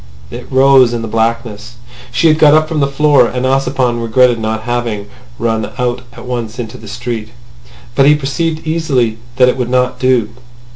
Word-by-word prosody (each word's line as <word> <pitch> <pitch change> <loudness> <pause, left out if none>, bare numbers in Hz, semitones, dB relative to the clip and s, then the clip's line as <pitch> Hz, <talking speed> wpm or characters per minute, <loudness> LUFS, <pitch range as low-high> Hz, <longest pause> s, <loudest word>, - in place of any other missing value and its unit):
It 120 - -9
rose 130 -2 +5
in 115 -1 -3
the - - -4
blackness. 115 0 -2 0.4
She 165 - +2
had 155 0 +3
got 150 -1 +6
up 155 0 +3
from 155 -1 -2
the 140 - +2
floor, 140 -2 +3
and 125 +2 -3
Ossipon 130 -2 0
regretted 120 +1 +2
not 110 0 -3
having 120 -4 -3 0.3
run 110 -2 -1
out 125 0 -1
at - - -11
once 120 -2 -4
into 115 -3 -7
the 110 - -12
street. 115 0 -5 0.6
But 135 - +3
he 150 - +6
perceived 155 +3 -3
easily 135 -9 0 0.2
that 125 0 +4
it 125 - +1
would 125 -2 -2
not 125 0 0
do. 125 -4 +2
125 Hz, 185 wpm, -14 LUFS, 115-135 Hz, 0.6 s, got